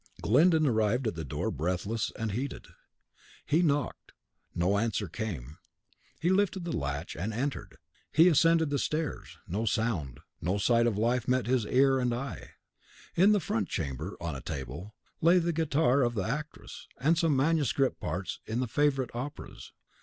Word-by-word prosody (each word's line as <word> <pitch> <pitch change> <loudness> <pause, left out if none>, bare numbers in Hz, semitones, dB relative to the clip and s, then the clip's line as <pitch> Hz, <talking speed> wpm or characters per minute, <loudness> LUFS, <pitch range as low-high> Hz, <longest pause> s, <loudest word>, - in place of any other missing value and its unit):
Glyndon 155 - +4
arrived 115 0 +1
at 110 - 0
the 80 -1 -5
door 70 - -3
breathless 90 +8 -2
and 110 -2 -2
heated. 130 +6 -4 0.8
He 155 +4 +2
knocked; 145 -5 -1 0.4
no 95 +4 +2
answer 110 -2 -1
came. 80 - -6 0.6
He 175 - +1
lifted 190 -2 +1
the 170 - -2
latch 70 +5 -3
and 100 +7 -3
entered. 115 - -4 0.3
He 165 +3 +6
ascended 165 -1 +4
the 140 - +1
stairs; 155 +2 -3
no 105 +6 -2
sound, 100 - -1 0.2
no 90 +5 0
sight 115 +3 +3
of 110 -4 0
life 120 +2 +1
met 125 -1 +2
his 125 -3 +1
ear 135 +1 +4
and 125 -2 0
eye. 135 +3 -6 0.6
In 190 +5 +6
the 210 - +4
front 115 - -2
chamber, 70 -5 -4
on 85 -4 -4
a 65 - -6
table, 70 - -6 0.3
lay 170 +3 +6
the 170 -1 +1
guitar 145 -4 +2
of 120 -2 +1
the 100 - 0
actress, 150 +6 -6
and 155 +6 +3
some 165 -3 +2
manuscript 140 -2 +1
parts 95 +1 -4
in 110 +2 -2
the 130 - 0
favourite 135 0 +1
operas. 130 +5 -7
125 Hz, 165 wpm, -29 LUFS, 100-150 Hz, 0.8 s, He